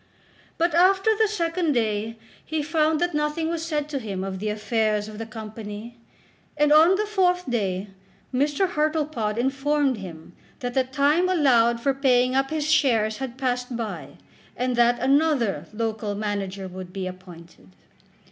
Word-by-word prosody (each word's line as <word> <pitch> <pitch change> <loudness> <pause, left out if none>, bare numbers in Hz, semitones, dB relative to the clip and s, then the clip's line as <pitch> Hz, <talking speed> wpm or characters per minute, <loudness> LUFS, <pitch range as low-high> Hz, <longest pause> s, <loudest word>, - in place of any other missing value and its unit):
But 340 0 +1
after 380 +5 +4
the 440 0 +3
second 340 -5 0
day 220 -1 -1 0.3
he 315 -1 -2
found 310 0 +1
that 350 0 0
nothing 300 +2 -1
was 330 -1 -2
said 300 -3 -2
to 285 -2 -2
him 200 -5 -4
of 190 -1 -4
the 215 +2 -2
affairs 215 -1 0
of 215 0 -9
the 225 - -5
Company, 220 +1 -8 0.6
and 295 0 +4
on 325 +5 +7
the 425 +2 0
fourth 360 -4 +1
day 200 -5 -1 0.4
Mr. 290 +7 +1
Hartlepod 300 -9 -1
informed 270 +1 +1
him 175 -4 -10 0.3
that 245 -1 -3
the 265 - +3
time 290 +7 +2
allowed 240 -9 +3
for 275 +2 +2
paying 255 -2 +2
up 270 0 +1
his 310 -2 -2
shares 240 -9 +2
had 260 -2 -5
passed 250 -2 -2
by, 195 - -6 0.4
and 250 0 0
that 240 0 +4
another 275 -5 +1
local 215 -1 -3
manager 200 -2 -3
would 185 0 -8
be 190 0 -4
appointed. 175 - -11
250 Hz, 155 wpm, -24 LUFS, 215-305 Hz, 0.6 s, on